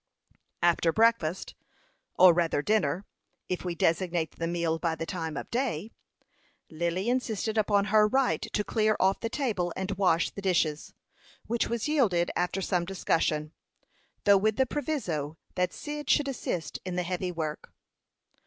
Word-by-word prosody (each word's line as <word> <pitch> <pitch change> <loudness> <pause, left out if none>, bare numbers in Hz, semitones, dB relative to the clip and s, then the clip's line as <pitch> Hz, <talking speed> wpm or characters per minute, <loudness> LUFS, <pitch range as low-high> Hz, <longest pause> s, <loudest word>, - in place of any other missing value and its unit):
After 170 -1 +3
breakfast 220 -5 +1 0.6
or 180 -1 +8
rather 165 -4 +1
dinner, 195 -2 +1 0.4
if 180 - -2
we 175 -2 -3
designate 170 -1 0
the 165 - -1
meal 170 -1 -1
by 165 -2 0
the 165 - -4
time 165 -4 -4
of - - -6
day 230 - -2 0.8
Lily 170 +5 -2
insisted 225 -3 -1
upon 205 -2 +2
her 215 -1 +6
right 265 +3 +1
to 210 - -2
clear 215 0 +1
off 190 +1 +2
the 230 - -3
table 215 -10 -1
and 190 +1 -3
wash 175 -3 +3
the 200 - -8
dishes, 165 -5 0 0.5
which 235 0 0
was 235 +2 -2
yielded 215 - +2
after 180 +2 -1
some 180 -2 0
discussion, 160 -4 -1 0.7
though 200 -1 +6
with 215 +2 +1
the 265 - +3
proviso 180 - -3 0.2
that 180 0 0
Cyd 295 -1 -6
should 290 - +3
assist 185 -10 -3
in 185 -1 -4
the 180 - 0
heavy 180 +1 -2
work. 155 -3 -5
185 Hz, 155 wpm, -28 LUFS, 170-220 Hz, 0.8 s, or